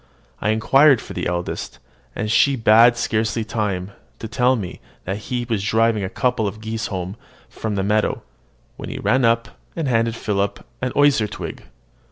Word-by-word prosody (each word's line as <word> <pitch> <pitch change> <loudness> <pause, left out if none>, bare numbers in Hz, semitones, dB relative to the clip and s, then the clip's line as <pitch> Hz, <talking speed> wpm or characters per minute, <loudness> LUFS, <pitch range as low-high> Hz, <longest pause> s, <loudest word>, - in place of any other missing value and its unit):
I 105 - 0
inquired 135 +5 +5
for - - -9
the - - -2
eldest; 85 0 -4 0.4
and 105 - -2
she 135 +3 +3
had 115 +3 +7
scarcely 110 0 0
time 100 -4 -2 0.3
to 115 - -6
tell 125 +3 +2
me 95 -7 -6 0.2
that 95 +2 -2
he 125 -1 -1
was 110 -5 -1
driving 110 0 +2
a 95 - -2
couple 125 -3 0
of 105 +2 -6
geese 110 0 -4
home 95 0 -4 0.3
from 110 -2 -4
the 95 - 0
meadow, 105 +2 0 0.5
when - - -7
he - - -5
ran 130 0 +2
up, 115 0 +2 0.3
and 165 -4 -2
handed 115 -2 +1
Philip 100 -2 -2 0.2
an 125 0 -1
osier 145 -6 +4
twig. - - -7
110 Hz, 175 wpm, -21 LUFS, 105-120 Hz, 0.5 s, had